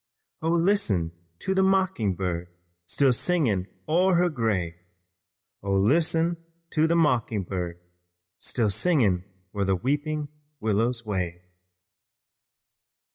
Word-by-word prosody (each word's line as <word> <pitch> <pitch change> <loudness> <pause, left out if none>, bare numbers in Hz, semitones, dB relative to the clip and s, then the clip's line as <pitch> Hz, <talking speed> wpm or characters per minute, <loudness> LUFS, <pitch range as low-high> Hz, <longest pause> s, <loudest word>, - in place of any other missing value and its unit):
Oh, 160 - 0
listen 165 - +2 0.3
to 190 - -1
the 190 - +3
mocking 190 - +2
bird 90 -2 -2 0.4
Still 130 +9 +3
singing 120 - +1 0.2
o'er 180 +4 +3
her 175 +1 +3
grave. 110 - -1 0.9
Oh, 100 0 -1
listen 160 - +2 0.3
to 155 0 +3
the 170 - +2
mocking 120 - +2
bird 90 -2 -4 0.6
Still 110 -5 0
singing 110 - +2 0.3
where 100 -2 -1
the 95 0 +2
weeping 145 - -1 0.3
willows 115 +2 0
wave." 90 -4 -2
115 Hz, 110 wpm, -26 LUFS, -, 0.9 s, the